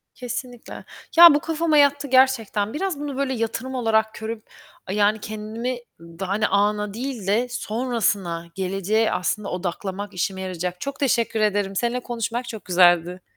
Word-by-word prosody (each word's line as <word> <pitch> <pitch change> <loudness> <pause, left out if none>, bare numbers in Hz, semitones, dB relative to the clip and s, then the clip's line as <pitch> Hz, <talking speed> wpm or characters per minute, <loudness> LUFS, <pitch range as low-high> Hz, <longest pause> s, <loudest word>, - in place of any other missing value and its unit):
Kesinlikle. 245 -1 -7 0.3
Ya, 340 -3 +11
bu 295 - +3
kafama 325 -1 0
yattı 285 0 +4
gerçekten. 245 -5 +2
Biraz 350 -2 -2
bunu 285 -2 -5
böyle 275 -1 0
yatırım 230 +3 -3
olarak 220 -3 +1
görüp 220 0 -7 0.4
yani 210 +2 +2
kendimi 220 +4 -4 0.2
daha 170 +3 -7
hani 210 +2 +1
ana 210 0 +1
değil 235 -4 -5
de 230 +5 +2
sonrasına, 210 -8 -1
geleceğe 195 +4 0
aslında 200 +3 -2
odaklamak 190 +3 -4
işime 190 +2 -2
yarayacak. 180 0 -4
Çok 280 - -5
teşekkür 235 -4 +1
ederim. 205 -2 0
Seninle 240 +4 0
konuşmak 235 0 -4
çok 220 -2 -8
güzeldi. 180 -1 +3
220 Hz, 145 wpm, -23 LUFS, 195-250 Hz, 0.4 s, Ya